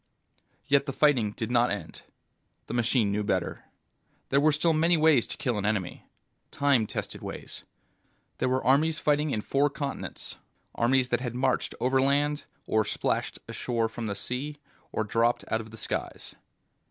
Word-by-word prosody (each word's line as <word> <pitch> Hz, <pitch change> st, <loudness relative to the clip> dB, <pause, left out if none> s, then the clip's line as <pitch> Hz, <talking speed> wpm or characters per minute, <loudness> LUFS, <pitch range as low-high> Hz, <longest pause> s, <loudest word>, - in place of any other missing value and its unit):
Yet 140 Hz, +1 st, +3 dB
the 135 Hz, -, -2 dB
fighting 130 Hz, -8 st, +3 dB
did 110 Hz, +2 st, -4 dB
not 120 Hz, 0 st, +4 dB
end. 105 Hz, -, -5 dB, 0.6 s
The -, -, -6 dB
machine 120 Hz, -3 st, +2 dB
knew 105 Hz, +1 st, 0 dB
better. 105 Hz, -, -2 dB, 0.6 s
There 140 Hz, +1 st, +3 dB
were 155 Hz, +1 st, +5 dB
still 160 Hz, +3 st, +2 dB
many 165 Hz, +2 st, +3 dB
ways 155 Hz, -6 st, +4 dB
to -, -, -6 dB
kill 120 Hz, -5 st, -1 dB
an 100 Hz, -, -3 dB
enemy. 100 Hz, -4 st, -2 dB, 0.4 s
Time 140 Hz, -6 st, +2 dB
tested -, -, -4 dB
ways. -, -, -8 dB, 0.7 s
There -, -, +1 dB
were 130 Hz, +1 st, +1 dB
armies 155 Hz, +4 st, +3 dB
fighting 150 Hz, +1 st, +1 dB
in 110 Hz, -, -1 dB
four 140 Hz, +6 st, +2 dB
continents, 140 Hz, 0 st, -5 dB, 0.3 s
armies 130 Hz, +2 st, +2 dB
that 120 Hz, 0 st, +1 dB
had 120 Hz, -2 st, -4 dB
marched 125 Hz, 0 st, 0 dB
overland, 140 Hz, +3 st, +2 dB, 0.2 s
or 110 Hz, 0 st, +2 dB
splashed -, -, -1 dB
ashore 115 Hz, -2 st, -1 dB
from 115 Hz, 0 st, -5 dB
the 100 Hz, -, -2 dB
sea, 140 Hz, +8 st, -4 dB, 0.3 s
or 110 Hz, -, 0 dB
dropped 115 Hz, +3 st, +1 dB
out 110 Hz, -, 0 dB
of 110 Hz, -, -11 dB
the 110 Hz, -, -11 dB
skies. -, -, -4 dB
130 Hz, 165 wpm, -28 LUFS, 115-145 Hz, 0.7 s, were